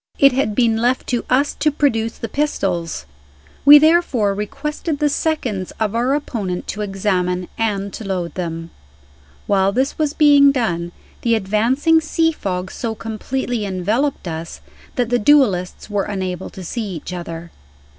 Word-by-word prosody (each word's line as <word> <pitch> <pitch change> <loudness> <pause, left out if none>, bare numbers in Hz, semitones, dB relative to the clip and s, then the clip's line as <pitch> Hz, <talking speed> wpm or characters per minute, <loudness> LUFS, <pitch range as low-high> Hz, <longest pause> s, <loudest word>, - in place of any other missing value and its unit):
It 275 0 +6
had 250 -5 0
been 230 -2 +3
left 245 +3 +1
to 245 -2 0
us 275 +3 +2
to 305 - +1
produce 230 -6 0
the 230 - -4
pistols. 180 - -2 0.6
We 290 +1 +11
therefore 295 -10 +3
requested 295 - -3
the 295 +1 +2
seconds 255 - -1
of 215 -2 0
our 245 +4 +1
opponent 205 -11 -3
to 210 - -4
examine 185 -3 -1
and 200 -3 -2
to - - -7
load 180 -5 -3
them. 165 -2 -5 0.7
While 195 -1 +2
this 260 +8 -1
was 300 -2 +1
being 285 -2 +6
done, 175 -10 -1 0.3
the 230 -1 +2
advancing 235 - +2
sea 325 +1 +1
fog 185 - -4
so 225 -2 -4
completely 230 +2 -3
enveloped 205 +7 -1
us 165 0 -6 0.4
that 245 -4 0
the 245 0 +2
duelists 205 -8 +2
were 205 -2 -1
unable 185 -2 -4
to 190 - -10
see 205 0 -4
each 165 +3 -7
other. 170 -1 -7
220 Hz, 155 wpm, -19 LUFS, 185-275 Hz, 0.7 s, We